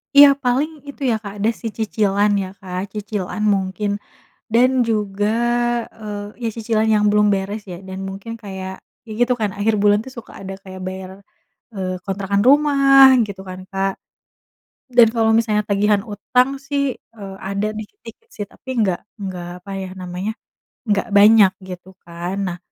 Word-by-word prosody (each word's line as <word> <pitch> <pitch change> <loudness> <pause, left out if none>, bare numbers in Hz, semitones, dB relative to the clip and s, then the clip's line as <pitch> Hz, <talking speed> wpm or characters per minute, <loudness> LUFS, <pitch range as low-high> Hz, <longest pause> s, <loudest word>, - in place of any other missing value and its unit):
Iya, 285 0 +10
paling 260 +5 +1 0.2
itu, 280 - -11
ya, - - +2
Kak, 200 -1 -6
ada, 210 +3 +2
sih, 225 - -4
cicilan, 210 -2 +1
ya, 185 - -6
Kak, 185 -2 -5
cicilan 210 0 -3
mungkin. 195 +2 -2 0.6
Dan 250 +2 +5 0.2
juga, 205 -2 0 0.8
eee, 205 -1 -5 0.2
iya 230 - 0
cicilan 220 -1 0
yang 210 0 +3
belum 210 0 +4
beres, 200 +2 -3
ya, 175 - -7
dan 190 0 -6
mungkin 195 +4 -7
kayak 190 -2 -6 0.3
ya, - - -12
gitu, 245 +1 +3
kan, 210 -2 +1
akhir 210 +2 +1
bulan, 205 0 +5
tuh, 260 - -9
suka 235 - -10
ada 195 0 -6
kayak 190 -1 -10
bayar, 185 0 -6 0.6
eee, 185 -2 -3
kontrakan 200 +1 0
rumah 275 -2 +7
gitu, 200 -2 -8
kan, 185 0 -7
Kak. 195 0 0 0.9
Dan 240 -3 +6
kalau 225 -1 +3
misalnya 215 -2 +1
tagihan 205 0 +2
utang, 235 +5 +1
sih, 280 -2 -1
eee, 200 -4 -11
ada 200 +2 -2
dikit-dikit, 410 - -11
sih, 205 - -6
tapi 230 - -21
nggak 185 -4 0 0.2
nggak 180 -2 -5 0.2
apa, 195 - -11
ya, 190 - -5
namanya 180 +3 -4 0.6
nggak 205 +3 +1
banyak 205 -1 +7 0.2
gitu, 180 0 -8 0.2
kan. 175 +2 -5
Nah, 175 0 -5
205 Hz, 160 wpm, -20 LUFS, 190-225 Hz, 0.9 s, Iya